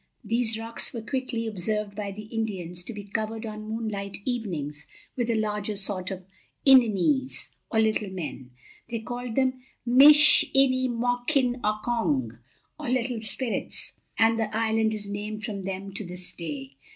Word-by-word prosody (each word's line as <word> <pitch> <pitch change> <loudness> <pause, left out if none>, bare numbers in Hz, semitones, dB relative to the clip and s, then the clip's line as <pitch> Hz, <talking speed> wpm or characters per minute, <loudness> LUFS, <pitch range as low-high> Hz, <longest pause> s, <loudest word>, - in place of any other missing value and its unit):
These 225 0 +1
rocks 225 +1 -5
were 230 -3 -5
quickly 255 -2 -2
observed 210 0 -2
by 205 -1 -3
the 210 +2 -8
Indians 195 -6 -4
to - - -6
be 205 -2 -7
covered, 220 +2 -3
on 215 0 -6
moonlight 215 -3 -3
evenings, 165 - -3 0.3
with 240 -2 -1
a 230 - +2
larger 210 -1 -1
sort 195 -2 -1
of 190 -2 -6 0.4
Ininees, 260 - +4 0.2
or 220 - +1
little 220 -2 +2
men. 150 -9 -6 0.4
They 230 - -2
called 245 +1 -5
them 260 -1 +1 0.2
Mish 295 +6 +8
in 270 -1 +6
e 255 0 +1
mok 245 +4 0
in 250 -2 +1
ok 215 0 0
ong, 130 - 0 0.4
or 295 -5 -4
Little 245 -2 0
Spirits, 225 +2 -3 0.2
and 225 0 +4
the 215 -1 -1
island 220 -1 +2
is 205 -1 -6
named 210 +1 -4
from 200 -3 -5
them 195 0 -5
to 205 - -3
this 180 0 -7
day. 140 -5 -6
220 Hz, 165 wpm, -27 LUFS, 200-240 Hz, 0.4 s, Mish